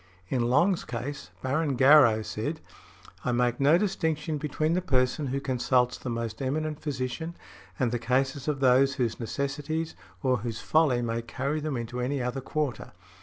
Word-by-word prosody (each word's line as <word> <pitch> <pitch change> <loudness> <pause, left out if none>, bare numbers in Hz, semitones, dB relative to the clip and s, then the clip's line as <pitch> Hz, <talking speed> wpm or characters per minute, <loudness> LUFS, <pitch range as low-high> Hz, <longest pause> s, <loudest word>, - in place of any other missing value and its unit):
In 130 - 0
Long's 170 +8 +3
case, 125 +4 -5
Baron 140 +2 0
Garrow 130 -5 +6
said, 130 +10 -4 0.6
"I 125 - 0
make 120 0 +1
no 145 +4 +5
distinction 160 -6 -1
between 155 +2 0
the 180 - +1
person 135 -2 +1
who 135 +2 -1
consults 125 -2 +1
the 130 - -6
most 115 -1 -4
eminent 150 +3 -2
physician 145 +4 -3 0.4
and 125 -5 +1
the 120 - -1
cases 130 +4 0
of 145 -3 -1
those 135 +1 +4
whose 120 -5 -1
necessities 145 +6 -3 0.3
or 130 -2 +3
whose 115 0 -4
folly 145 -6 +2
may 115 0 -1
carry 135 +6 -2
them 150 -3 -2
into 120 +1 -4
any 135 +3 -1
other 125 +2 -2
quarter. 140 -1 -3
135 Hz, 165 wpm, -28 LUFS, 125-150 Hz, 0.6 s, Garrow